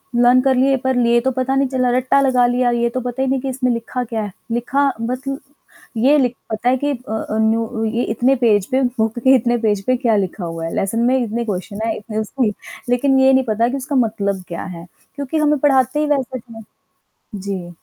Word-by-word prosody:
Learn 245 Hz, +1 st, +5 dB
कर 265 Hz, -1 st, +2 dB
लिए 270 Hz, +1 st, +3 dB
पर 260 Hz, -1 st, +1 dB
लिए 235 Hz, -1 st, +3 dB
तो 265 Hz, +1 st, 0 dB
पता 260 Hz, +1 st, -1 dB
नहीं 275 Hz, 0 st, +2 dB
चला 255 Hz, -1 st, 0 dB
रट्टा 260 Hz, +2 st, +2 dB
लगा 255 Hz, -2 st, +3 dB
लिया, 245 Hz, 0 st, +1 dB
ये 235 Hz, 0 st, +1 dB
तो 255 Hz, -, -3 dB
पता 250 Hz, +2 st, -4 dB
ही 265 Hz, -, +1 dB
नहीं 265 Hz, 0 st, +1 dB
कि 270 Hz, -, -3 dB
इसमें 255 Hz, -1 st, 0 dB
लिखा 235 Hz, +2 st, -3 dB
क्या 225 Hz, -2 st, -3 dB
है? 205 Hz, -, -6 dB, 0.2 s
लिखा 250 Hz, +4 st, 0 dB, 0.2 s
मतल 255 Hz, +3 st, -3 dB, 0.6 s
ये 275 Hz, +6 st, +4 dB
लि 255 Hz, -3 st, +3 dB, 0.2 s
पता 220 Hz, +3 st, 0 dB
है 260 Hz, -, +2 dB
कि 290 Hz, -, +1 dB
अ 250 Hz, -4 st, -7 dB
अ, 220 Hz, 0 st, -3 dB
न्यू 225 Hz, +1 st, +2 dB
अ, 225 Hz, -2 st, -3 dB
ये 240 Hz, -, +1 dB
इतने 250 Hz, +4 st, +2 dB
पेज 215 Hz, -6 st, +2 dB
पे 265 Hz, +1 st, +2 dB, 0.2 s
बुक 220 Hz, +1 st, 0 dB
के 265 Hz, +2 st, +5 dB
इतने 240 Hz, 0 st, +1 dB
पेज 205 Hz, -2 st, +1 dB
पे 255 Hz, -, +2 dB
क्या 235 Hz, -4 st, +1 dB
लिखा 190 Hz, -1 st, -2 dB
हुआ 165 Hz, 0 st, -5 dB
है? 165 Hz, -, -4 dB
लेसन 195 Hz, +4 st, -1 dB
में 260 Hz, +1 st, +3 dB
इतने 235 Hz, +1 st, -3 dB
क्वेश्चन 200 Hz, +1 st, -4 dB
हैं, 225 Hz, -, -1 dB
इतने 215 Hz, 0 st, -7 dB
उसकी 220 Hz, 0 st, -1 dB, 0.4 s
लेकिन 265 Hz, +2 st, +3 dB
ये 265 Hz, 0 st, +5 dB
नहीं 265 Hz, 0 st, +4 dB
पता 225 Hz, +2 st, +2 dB
कि 275 Hz, -, -2 dB
उसका 275 Hz, +2 st, -4 dB
मतलब 205 Hz, -6 st, 0 dB
क्या 170 Hz, -, -5 dB
है? 170 Hz, +1 st, -10 dB, 0.3 s
क्योंकि 285 Hz, +2 st, -3 dB
हमें 300 Hz, -1 st, +2 dB
पढ़ाते 270 Hz, 0 st, +2 dB
ही 305 Hz, -, +1 dB
वैसे 260 Hz, -1 st, -4 dB
थे। 225 Hz, -1 st, -12 dB, 0.8 s
जी। 190 Hz, -3 st, -5 dB
245 Hz, 230 wpm, -19 LUFS, 220-265 Hz, 0.8 s, Learn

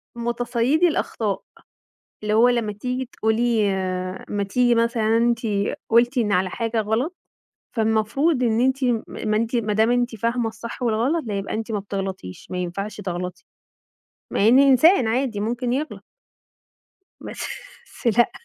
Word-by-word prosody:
متصيدي 240 Hz, +7 st, +1 dB
الأخطاء. 220 Hz, -, -1 dB, 0.8 s
اللي 210 Hz, 0 st, 0 dB
هو 235 Hz, +3 st, +6 dB
لمّا 230 Hz, -4 st, 0 dB
تيجي 250 Hz, +4 st, -3 dB
تقولي 220 Hz, -1 st, +1 dB, 0.6 s
ما 205 Hz, -1 st, -1 dB
تيجي 240 Hz, +4 st, +2 dB
مثلًا 230 Hz, -1 st, +2 dB
أنتِ 235 Hz, 0 st, +2 dB, 0.5 s
قُلتِ 240 Hz, +3 st, +4 dB
إن 210 Hz, -3 st, +1 dB
على 185 Hz, 0 st, +1 dB
حاجة 230 Hz, +1 st, -1 dB
غلط، 235 Hz, -, -1 dB, 0.6 s
فالمفروض 225 Hz, +7 st, +1 dB
إن 230 Hz, 0 st, +2 dB
أنتِ 265 Hz, +1 st, +1 dB
م 240 Hz, -3 st, +1 dB
ما 215 Hz, -1 st, -2 dB
إنتِ 230 Hz, +2 st, -1 dB
ما 215 Hz, -2 st, 0 dB
دام 220 Hz, +2 st, +3 dB
أنتِ 245 Hz, -1 st, +1 dB
فاهمة 230 Hz, +2 st, 0 dB
الصح 230 Hz, +3 st, -8 dB
والغلط 245 Hz, +8 st, +1 dB
لأ 210 Hz, -, -3 dB
يبقى 195 Hz, -, -4 dB
أنتِ 225 Hz, +1 st, -4 dB
ما 210 Hz, -, 0 dB
بتغلَطيش، 195 Hz, -, -6 dB
ما 180 Hz, -, -3 dB
ينفعش 180 Hz, +4 st, -4 dB
تغلطي. 180 Hz, -1 st, -5 dB, 0.9 s
مع 205 Hz, -, +2 dB
إني 270 Hz, +4 st, +6 dB
إنسان 270 Hz, -, +5 dB
عادي 235 Hz, -2 st, 0 dB
ممكن 240 Hz, +2 st, -1 dB
يغلَط. 300 Hz, +4 st, -3 dB, 1.2 s
بس -, -, -6 dB, 0.7 s
لأ. 240 Hz, -, +5 dB
230 Hz, 145 wpm, -23 LUFS, 215-245 Hz, 1.2 s, هو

